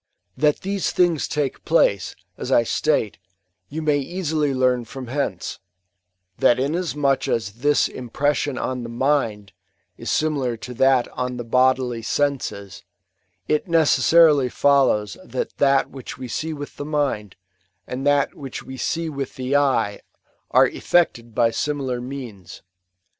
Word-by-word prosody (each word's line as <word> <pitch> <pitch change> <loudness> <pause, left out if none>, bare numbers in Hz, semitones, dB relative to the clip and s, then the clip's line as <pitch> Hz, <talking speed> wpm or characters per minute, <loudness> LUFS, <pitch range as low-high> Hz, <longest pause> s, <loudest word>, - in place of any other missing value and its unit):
That 150 -1 +2
these 195 0 -1
things 175 -4 +2
take 145 -3 -2
place, 100 - +2 0.2
as - - -5
I 120 - +5
state, 115 - 0 0.5
you 160 +2 -4
may 150 -2 +2
easily 155 -1 -1
learn 130 -2 +2
from 130 +2 -8
hence; 120 -7 -3 0.8
that 120 - +4
inasmuch 145 -1 0
as 110 -4 -1
this 145 +1 +3
impression 140 +2 -1
on 130 -1 -2
the 120 - -6
mind* 115 -5 0 0.5
is - - -5
similar 140 -6 0
to 125 +3 -8
that 130 0 +3
on 125 0 -4
the 120 - -4
bodily 125 0 +2
senses, 115 -7 -2 0.6
it 150 +4 0
necessarily 155 -3 +5
follows 135 -8 +2
that - - -4
thai 135 -1 +4
which 130 -2 -9
we 130 -1 -6
see 160 +6 -3
with 145 -2 -7
the - - -4
mind, 140 -10 -1 0.5
and 130 +2 -5
that 145 -1 +3
toMch 135 -3 -8
die 130 - -8
fMwith 140 0 -3
the 130 +2 -2
eye, 135 -8 +2 0.5
are - - +6
effected 120 -10 0
by 115 -1 +3
similar 135 -3 -2
means. 120 -9 -8
135 Hz, 135 wpm, -22 LUFS, 120-150 Hz, 0.8 s, are